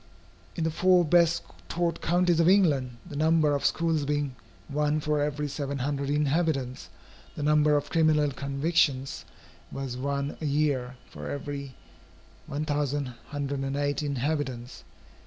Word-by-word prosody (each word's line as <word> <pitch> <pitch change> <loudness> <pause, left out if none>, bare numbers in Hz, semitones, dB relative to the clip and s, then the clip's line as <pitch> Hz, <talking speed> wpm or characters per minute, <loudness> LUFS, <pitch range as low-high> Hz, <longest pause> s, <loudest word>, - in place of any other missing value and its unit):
In 165 - -2
the 160 - +1
four 180 +1 +4
best 170 +1 +4 0.3
taught 170 -1 -1
counties 175 0 +2
of 165 +1 +5
England, 145 -11 +3
the - - -8
number 155 0 +3
of 140 - -1
schools 165 -2 +1
being 145 -2 -1 0.3
one 150 +1 0
for 150 0 0
every 150 0 -1
seven 140 0 -3
hundred 140 +1 -2
inhabitants, 145 -3 0 0.5
the 150 - -4
number 150 0 +4
of 145 0 -4
criminal 155 -3 +3
convictions 140 0 0 0.5
was 135 -2 -4
one 140 +2 -2
a - - -2
year 140 -4 0
for 75 0 -8
every 140 -1 -5 0.7
1108 145 -1 -2
inhabitants. 140 -3 -3
145 Hz, 125 wpm, -27 LUFS, 140-155 Hz, 0.7 s, of